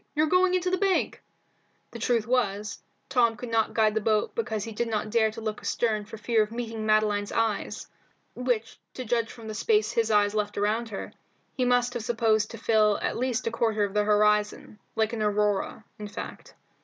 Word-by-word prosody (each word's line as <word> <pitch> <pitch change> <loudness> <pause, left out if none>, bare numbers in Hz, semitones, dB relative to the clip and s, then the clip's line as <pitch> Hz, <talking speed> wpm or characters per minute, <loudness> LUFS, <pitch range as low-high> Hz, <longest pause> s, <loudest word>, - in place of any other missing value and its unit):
You're 305 +1 +3
going 365 +3 +3
into 365 0 0
the 370 - +1
bank!" 390 -2 +1 0.7
The - - -8
truth 235 -3 +1
was, 210 -4 0
that - - -29 0.3
Tom 235 -4 +3
could 245 +2 -7
not 225 -1 +1
guide 215 -1 +3
the 220 - 0
boat 215 0 +1
because 220 -3 -2
he 225 - -6
did 235 +2 -2
not 215 -1 -2
dare 220 -1 +3
to 220 +1 -8
look 215 -1 -4
astern 215 -3 0
for 220 +1 -9
fear 225 0 +2
of 215 0 -1
meeting 225 -2 -4
Madeline's 210 -1 +2
eyes, 225 -2 -1 0.5
which, 245 -3 -2 0.2
to 255 - -5
judge 230 0 0
from 230 -3 -11
the 215 - -4
space 425 - +2
his 225 -1 +1
eyes 205 -1 +3
left 210 -1 -2
around 220 +3 0
her, 200 - -6 0.4
he 255 - +1
must 245 0 +2
have 240 -3 -4
supposed 225 -2 +1
to 230 - -8
fill 215 -2 +3
at - - -1
least 255 0 -1
a 230 - 0
quarter 225 -2 +1
of 200 -1 -2
the 210 0 +2
horizon, 210 0 +1 0.2
like 220 0 +1
an 225 - -3
aurora, 210 0 0
in 210 - -5
fact. 205 - -8
220 Hz, 205 wpm, -27 LUFS, 210-235 Hz, 0.7 s, You're